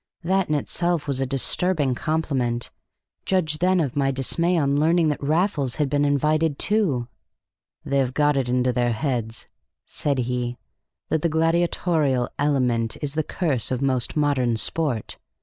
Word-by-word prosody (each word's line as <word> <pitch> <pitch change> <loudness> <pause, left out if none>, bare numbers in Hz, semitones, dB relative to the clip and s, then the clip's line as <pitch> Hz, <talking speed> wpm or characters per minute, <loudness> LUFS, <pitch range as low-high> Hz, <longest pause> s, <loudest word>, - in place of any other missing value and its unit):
That 190 +1 +1
in 155 - +2
itself 170 +2 -1
was 135 -2 -1
a 135 - 0
disturbing 145 +2 +1
compliment: 130 -5 -1 0.5
judge 160 -5 0
then 185 +1 +3
of 140 -7 -1
my 140 -1 +2
dismay 170 +7 +1
on 140 -2 +2
learning 165 +1 +3
that 150 - -2
Raffles 150 - 0
had 145 -3 -1
been 145 0 +2
invited 150 +1 +1
too! 175 - +1 0.8
"They 140 - +1
have 130 -1 -1
got 150 -1 +3
it 130 -3 0
into 125 0 +1
their 120 -1 +1
heads," 115 -3 -2 0.4
said 140 -2 -1
he, 125 -1 -2 0.5
"that 160 - +1
the 170 - +1
gladiatorial 160 -4 +1
element 125 -6 +1
is 140 -1 -3
the 155 - +1
curse 150 - -1
of 130 +1 -2
most 130 0 0
modern 130 -6 +1
sport. 135 -3 -2
145 Hz, 155 wpm, -23 LUFS, 125-160 Hz, 0.8 s, then